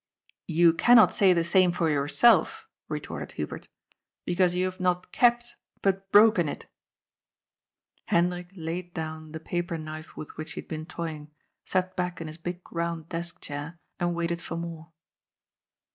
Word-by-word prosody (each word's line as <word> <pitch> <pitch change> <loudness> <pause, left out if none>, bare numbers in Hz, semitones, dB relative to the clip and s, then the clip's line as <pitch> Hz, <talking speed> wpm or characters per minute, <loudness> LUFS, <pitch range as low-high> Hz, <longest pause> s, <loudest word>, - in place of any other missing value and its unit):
" - - -37
You 170 -1 +7
cannot 235 +5 +6
say 195 -2 +5
the 170 -2 +3
same 180 +1 +4
for 170 -1 0
yourself," 150 +10 +3 0.2
retorted - - -5
Hu - - -2
bert, - - -9 0.3
" - - -63
because 180 0 +2
you 180 +1 +1
have 185 0 -4
not 180 0 0
kept, 240 0 +2 0.3
but 195 0 0
broken 205 -7 +6
it." - - -7 1.4
Hendrik 175 +1 +1
laid 170 +1 -5
down 155 -1 -5
the 160 - -6
paper 175 +1 -3
knife 155 0 -8
with 155 - -8
which 155 +1 -6
he - - -5
had - - -22
been 155 0 -6
toying, 155 -4 -6 0.4
sat 185 0 0
back 180 -1 -2
in 165 - -5
his 155 +1 -8
big 175 +1 -5
round 170 -1 -3
desk 170 0 -5
chair, 145 +3 -6 0.2
and 175 -1 0
waited 170 0 -2
for 165 - -5
more. 165 -1 -7
170 Hz, 165 wpm, -27 LUFS, 160-180 Hz, 1.4 s, You